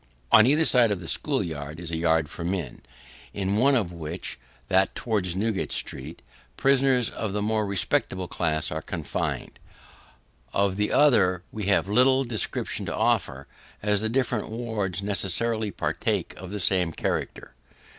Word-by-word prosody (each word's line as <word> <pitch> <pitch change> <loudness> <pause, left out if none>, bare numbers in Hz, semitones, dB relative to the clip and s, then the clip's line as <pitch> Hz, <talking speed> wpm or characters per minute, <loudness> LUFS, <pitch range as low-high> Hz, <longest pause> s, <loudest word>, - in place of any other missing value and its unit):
On 110 - +8
either 150 +4 +3
side 125 -5 +4
of 100 -3 -1
the 85 - -9
school - - 0
yard 75 -1 -6
is 85 -1 -6
a - - -1
yard 80 -1 +2
for 85 - -8
men, 85 -7 -3 0.5
in 100 0 -1
one 135 +4 +4
of 100 -9 0
which 85 -2 -6 0.3
that 95 0 +2
towards 100 -7 -1
Newgate 105 +1 -1
street 70 +5 -3 0.3
prisoners 135 -3 +3
of 105 -3 -4
the 105 - -1
more 110 -1 0
respectable 95 -1 0
class 80 -4 -1
are 80 - -3
confined. 80 -1 -4 0.9
Of 100 -1 +1
the 105 0 0
other, 100 -11 +4
we 105 -3 -5
have 100 -1 +2
little 130 +5 +4
description 120 -4 -2
to - - -3
offer, 65 +1 0 0.4
as 105 -1 +2
the 110 - -1
different 120 -2 -1
wards 110 -5 -3
necessarily 105 +3 +2
partake - - -2
of 95 0 -9
the 105 +1 -5
same 90 -2 +2
character. - - -3
100 Hz, 155 wpm, -26 LUFS, 85-110 Hz, 0.9 s, On